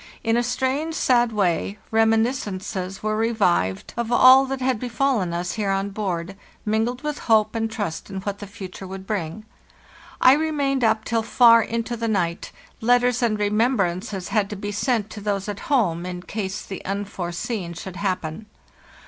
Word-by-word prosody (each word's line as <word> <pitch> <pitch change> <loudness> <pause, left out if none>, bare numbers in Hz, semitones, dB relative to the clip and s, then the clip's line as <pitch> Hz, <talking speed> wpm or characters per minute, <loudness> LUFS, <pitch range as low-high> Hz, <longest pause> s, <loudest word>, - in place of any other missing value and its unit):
In 225 0 +2
a 240 - +3
strange, 265 +6 -1
sad 240 -5 +3
way, 200 -1 0
reminiscences 220 -4 0
were 215 0 0
revived 200 - +1
of 235 0 -2
all 260 +2 +8
that 270 0 -3
had 255 -3 0
befallen 245 -5 0
us 175 +1 -2
here 210 -3 -2
on 195 +1 0
board, 195 -3 -3 0.3
mingled 225 +4 0
with 300 -1 -3
hope 215 -1 +4
and 225 -1 -1
trust 205 -7 -4
in 195 - -4
what 200 0 -4
the 205 - -7
future 190 -2 -9
would 190 0 -8
bring. 200 0 -4 0.7
I 255 - +7
remained 285 -3 0
up 220 -1 +2
till 230 -1 +1
far 230 0 +6
into 230 +1 -2
the 230 0 -3
night; 175 -6 -1 0.3
letters 245 +1 +3
and 225 -3 +1
remembrances 205 -4 0
had 210 -3 +1
to 210 - -5
be 205 +1 -5
sent 215 0 0
to 210 - -8
those 200 -1 -2
at 205 -1 -4
home, 180 - +1
in 180 -1 -6
case 200 0 -4
the 195 - -7
unforeseen 190 -1 -4
should 180 +2 -7
hap 195 -2 -1
pen. 160 +8 -7
215 Hz, 170 wpm, -23 LUFS, 195-235 Hz, 0.7 s, all